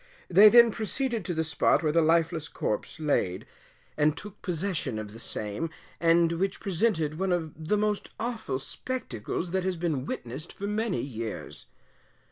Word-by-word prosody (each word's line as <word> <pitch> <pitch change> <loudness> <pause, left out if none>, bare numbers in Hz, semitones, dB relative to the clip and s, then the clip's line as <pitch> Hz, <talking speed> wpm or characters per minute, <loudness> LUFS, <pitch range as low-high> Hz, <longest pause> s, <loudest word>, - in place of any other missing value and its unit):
They 200 +4 +9
then 235 0 +8
proceeded 230 +1 -2
to 180 - -1
the 160 - +1
spot 160 0 +2
where 155 - +2
the 165 +2 +4
lifeless 165 0 +2
corpse 110 +6 -3
laid, 95 - 0 0.5
and 150 0 +2
took 210 -1 -8
possession 170 - -2
of 105 -1 -6
the 115 - -10
same, 110 +8 -2 0.3
and 170 0 +4
which 190 +3 -1
presented 170 -6 0
one 190 -1 0
of 165 -4 -1
the 210 - +3
most 210 0 0
awful 225 - -2
spectacles 170 - -4
that 190 0 0
has 185 -1 0
been 155 -6 -1
witnessed 130 +7 -5
for 200 - -6
many 210 -1 -1
years. 115 -5 -6
170 Hz, 160 wpm, -28 LUFS, 150-205 Hz, 0.5 s, They